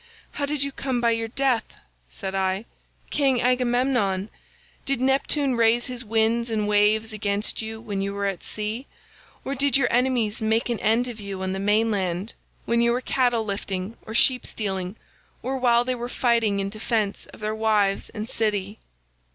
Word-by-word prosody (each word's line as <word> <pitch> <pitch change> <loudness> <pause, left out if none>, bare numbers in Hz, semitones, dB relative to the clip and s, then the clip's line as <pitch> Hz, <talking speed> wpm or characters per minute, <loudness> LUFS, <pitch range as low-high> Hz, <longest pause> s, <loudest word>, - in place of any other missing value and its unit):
'How 285 - -2
did 290 -1 -1
you 280 - -2
come 265 -2 -2
by 235 -1 +3
your 225 0 0
death,' 255 0 0 0.3
said 190 - -5
I, 190 +2 0 0.5
'King 270 -4 +2
Agamemnon? 245 -5 +1 0.5
Did 275 -3 0
Neptune 270 +1 +2
raise 230 +1 +3
his 250 -2 -5
winds 225 +1 +1
and 215 -2 0
waves 210 +1 +3
against 205 0 -1
you 220 0 -5
when 205 -4 -3
you 200 0 -1
were 200 0 -2
at 195 -3 -2
sea, 215 +5 -3 0.6
or 275 - -2
did 275 -1 +3
your 260 -3 +2
enemies 240 -4 +1
make 220 +2 +1
an 235 - -1
end 230 +3 +2
of 235 -3 -7
you 195 -2 -5
on 190 0 -1
the 190 - -3
main 210 +3 +2
land 190 0 -2 0.3
when 235 0 +2
you 235 0 +3
were 245 - +1
cattle 245 -3 +1
lifting 195 0 -3
or 220 - -8
sheep 250 +1 +4
stealing, 190 -2 -3 0.5
or 265 +2 -1
while 240 -2 +4
they 255 - 0
were 240 0 -5
fighting 230 -5 +2
in 195 0 -1
defence 215 -1 -1
of - - -14
their 215 0 -2
wives 215 -3 +1
and 215 -1 -5
city? 210 -2 -1
225 Hz, 180 wpm, -25 LUFS, 205-245 Hz, 0.6 s, sheep